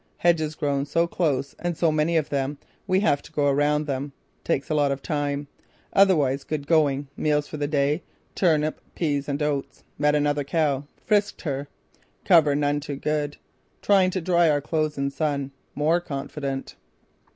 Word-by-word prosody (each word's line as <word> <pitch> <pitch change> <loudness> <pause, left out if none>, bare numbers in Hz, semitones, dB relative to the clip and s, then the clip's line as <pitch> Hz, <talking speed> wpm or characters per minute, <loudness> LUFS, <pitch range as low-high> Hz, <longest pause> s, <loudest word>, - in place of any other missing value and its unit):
Hedges 160 -3 +2
grown 140 -1 -1
so 165 +4 +2
close 140 -6 -1
and 175 -2 -2
so 165 -2 +3
many 155 +2 +2
of 155 -2 0
them, 140 +1 -1 0.3
we 185 +1 +3
have 145 -9 +2
to - - -15
go 145 - 0
around 145 +2 +2
them. 140 0 -3 0.3
Takes 135 - -1
a - - +3
lot 145 -2 +2
of 135 0 -4
time. 145 -2 -2 0.5
Otherwise 150 -9 +4
going 145 -2 +1
good. - - -9
Meals 150 -1 +1
for 155 - -7
the 145 -1 -1
day: 145 +2 +1 0.3
turnip, 155 -4 +1
peas 145 -4 -1
and 145 +1 -1
oats. 145 -2 -2 0.2
Met 150 0 +3
another 145 0 +1
cow. 145 -2 0 0.2
Frisked 205 -2 +1
her. 140 -3 -3 0.6
Cover 155 -6 +5
none 145 0 +1
too 145 -1 -5
good. 150 +1 -2 0.5
Trying 195 -2 +4
to 185 0 -2
dry 170 -1 +3
our 145 -1 +3
clothes 155 0 -1
in 140 0 -1
sun. 140 -2 -2 0.2
More 160 +4 +2
confident." 140 -3 -5
150 Hz, 170 wpm, -25 LUFS, 140-160 Hz, 0.6 s, Cover